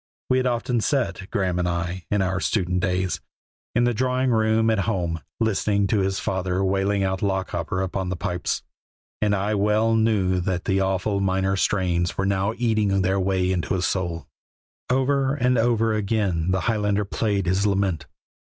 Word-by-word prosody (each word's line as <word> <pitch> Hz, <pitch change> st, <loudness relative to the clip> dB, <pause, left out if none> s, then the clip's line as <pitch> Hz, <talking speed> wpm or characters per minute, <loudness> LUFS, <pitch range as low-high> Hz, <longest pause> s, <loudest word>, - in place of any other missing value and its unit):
We 130 Hz, -, +4 dB
had 130 Hz, 0 st, +1 dB
often 120 Hz, -1 st, 0 dB
sat, 120 Hz, -7 st, -1 dB
Graeme 95 Hz, -3 st, 0 dB
and 90 Hz, 0 st, 0 dB
I, 85 Hz, +1 st, -3 dB
in 105 Hz, -2 st, +1 dB
our 95 Hz, 0 st, -1 dB
student 90 Hz, +2 st, 0 dB
days, 90 Hz, -4 st, -1 dB, 0.5 s
in 120 Hz, -, +3 dB
the 120 Hz, 0 st, +2 dB
drawing 130 Hz, +2 st, +1 dB
room 110 Hz, 0 st, +3 dB
at 110 Hz, -, +1 dB
home, 85 Hz, -6 st, -2 dB, 0.2 s
listening 100 Hz, -2 st, +1 dB
to 105 Hz, -, +2 dB
his 95 Hz, 0 st, 0 dB
father 95 Hz, 0 st, -1 dB
wailing 100 Hz, +1 st, +1 dB
out 95 Hz, 0 st, -1 dB
"Lochaber" 95 Hz, -2 st, -1 dB
upon 95 Hz, 0 st, -3 dB
the 95 Hz, -, -2 dB
pipes, 90 Hz, 0 st, -2 dB, 0.6 s
and 105 Hz, -1 st, +2 dB
I 100 Hz, +2 st, -1 dB
well 105 Hz, +2 st, +2 dB
knew 105 Hz, -5 st, +2 dB
that 90 Hz, 0 st, -2 dB
the 95 Hz, 0 st, +1 dB
awful 95 Hz, +1 st, 0 dB
minor 95 Hz, 0 st, +1 dB
strains 90 Hz, -3 st, 0 dB
were 95 Hz, -, 0 dB
now 100 Hz, +2 st, 0 dB
eating 110 Hz, -5 st, +1 dB
their 95 Hz, +1 st, +1 dB
way 95 Hz, -1 st, +1 dB
into 90 Hz, +1 st, -1 dB
his 90 Hz, -1 st, 0 dB
soul. 85 Hz, -4 st, -2 dB, 0.6 s
Over 135 Hz, +1 st, +2 dB
and 125 Hz, -2 st, +2 dB
over 115 Hz, -1 st, +2 dB
again 100 Hz, -5 st, 0 dB
the 95 Hz, 0 st, +1 dB
Highlander 105 Hz, -2 st, 0 dB
played 100 Hz, -1 st, -1 dB
his 95 Hz, +3 st, +1 dB
lament. 95 Hz, -7 st, 0 dB
95 Hz, 170 wpm, -24 LUFS, 95-110 Hz, 0.6 s, We